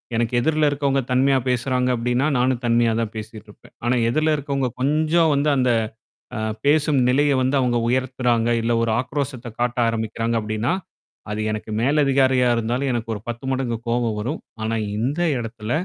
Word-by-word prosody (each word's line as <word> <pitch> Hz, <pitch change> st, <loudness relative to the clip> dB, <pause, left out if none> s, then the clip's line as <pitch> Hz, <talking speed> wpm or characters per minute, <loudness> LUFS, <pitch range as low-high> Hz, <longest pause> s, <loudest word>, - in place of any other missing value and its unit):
எனக்கு 115 Hz, +1 st, 0 dB
எதிர்ல 155 Hz, +3 st, +2 dB
இருக்கவங்க 140 Hz, -1 st, 0 dB
தன்மையா 135 Hz, +2 st, +3 dB
பேசுறாங்க 125 Hz, +1 st, 0 dB
அப்டின்னா, 125 Hz, +3 st, 0 dB
நானும் 125 Hz, 0 st, +1 dB
தன்மையா 115 Hz, 0 st, +3 dB
தான் 115 Hz, -2 st, -2 dB
பேசிட்டுருப்பேன். 110 Hz, -1 st, -10 dB
ஆனா 120 Hz, -, +2 dB
எதிர்ல 155 Hz, +4 st, +2 dB
இருக்கவங்க 140 Hz, -2 st, -1 dB
கொஞ்சம் 155 Hz, +3 st, +2 dB
வந்து 145 Hz, +2 st, +1 dB
அந்த 125 Hz, -1 st, +2 dB, 0.7 s
அ -, -, -3 dB, 0.3 s
பேசும் 150 Hz, -1 st, +3 dB
நிலைய 145 Hz, +3 st, +3 dB
வந்து 130 Hz, +2 st, +1 dB
அவங்க 125 Hz, -2 st, +1 dB
உயர்த்துறாங்க. 125 Hz, -2 st, +1 dB
இல்ல 115 Hz, +1 st, 0 dB
ஒரு 115 Hz, -1 st, +1 dB
ஆக்ரோஷத்த 130 Hz, -1 st, -4 dB
காட்ட 120 Hz, +1 st, -1 dB
ஆரம்பிக்கறாங்க 115 Hz, 0 st, -2 dB
அப்டின்னா. 110 Hz, +3 st, -2 dB, 0.6 s
அது 105 Hz, -, -3 dB
எனக்கு 110 Hz, 0 st, -5 dB
மேல்லதிகாரியா 135 Hz, -1 st, +3 dB
இருந்தாலும் 120 Hz, +4 st, -1 dB
எனக்கு 115 Hz, -2 st, -3 dB
ஒரு 105 Hz, -, -6 dB
10 120 Hz, +2 st, -5 dB
மடங்கு 130 Hz, -3 st, -1 dB
கோவம் 115 Hz, -2 st, 0 dB
வரும். 130 Hz, +10 st, -3 dB, 0.2 s
ஆனா 115 Hz, +1 st, -1 dB, 0.2 s
இந்த 130 Hz, +9 st, -1 dB, 0.2 s
எடத்துல, 115 Hz, -1 st, -6 dB
125 Hz, 155 wpm, -22 LUFS, 115-140 Hz, 0.7 s, தன்மையா